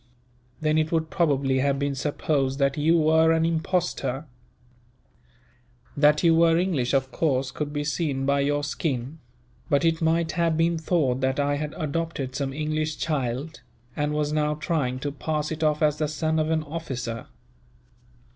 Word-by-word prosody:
Then 155 0 +2
it 155 0 0
would 160 -1 0
probably 140 -7 +1
have 140 +1 +1
been 140 0 -1
supposed 135 -1 -1
that 140 -1 +1
you 160 +3 +3
were 160 +1 +4
an 165 0 +2
impostor. 160 -5 -1 1.7
That 150 +2 +4
you 165 -1 +5
were 165 0 +4
English, 155 -8 0
of 130 0 0
course 135 -4 0
could 145 +1 -4
be 145 0 -2
seen 145 -3 -1
by 140 +1 +2
your 145 +1 +1
skin; 145 -1 -3 0.5
but 140 +2 +2
it 165 0 +1
might 160 0 +1
have 165 -2 +1
been 165 0 +2
thought 155 -6 +1
that 130 +2 0
I 145 0 +1
had 150 0 -4
adopted 155 -4 -3
some 135 0 -2
English 155 +1 -2
child, 140 0 -3 0.3
and 150 0 -1
was 150 0 -1
now 150 0 +1
trying 150 -5 -1
to 145 - -2
pass 150 +1 -3
it 160 0 -4
off 150 0 +2
as 150 -1 +3
the 155 - +1
son 155 +1 -1
of 155 0 0
an 160 -1 +1
officer." 130 -7 -5
150 Hz, 165 wpm, -25 LUFS, 140-160 Hz, 1.7 s, you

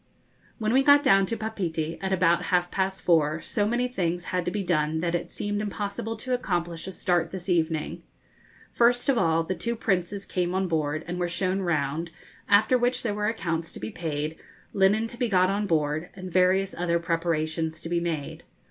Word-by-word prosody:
When 220 0 0
we 265 - +5
got 285 +1 +6
down 195 0 +5
to 230 - -2
Papeete, 170 -8 -3
at 190 0 -2
about 175 -2 +3
half 175 -1 +1
past 190 0 -1
four, 155 -2 +3
so 205 +4 -1
many 240 +3 +1
things 175 -7 -2
had 180 -1 0
to - - +1
be 205 +2 -2
done 160 -3 +1
that 170 +1 -1
it 175 - -2
seemed 205 0 -2
impossible 210 +2 -4
to 255 +3 -3
accomplish 175 -8 -2
a - - -4
start 175 -3 0
this 180 0 -7
evening. 160 -3 0 0.7
First 245 +2 +3
of 260 -4 +3
all 165 -3 +2
the 175 - -2
two 235 +7 -2
Princes 195 -2 -1
came 180 0 -1
on 190 0 +1
board, 155 -2 -1
and 175 +1 -4
were 175 -1 0
shown 185 +2 0
round, 160 -1 -1 0.4
after 215 +5 +5
which 245 +1 +1
there 220 -4 0
were 210 0 -1
accounts 165 -7 -2
to - - -8
be 110 - -5
paid, 155 -1 -3 0.4
linen 200 +3 +3
to 235 +1 -8
be 245 -2 0
got 185 -1 +3
on 205 +1 -1
board; 155 0 0
and 185 -1 -7
various 185 +2 +3
other 170 -1 0
preparations 165 -1 -1
to - - -6
be 170 0 0
made. 165 -4 -3
180 Hz, 200 wpm, -26 LUFS, 165-205 Hz, 0.7 s, got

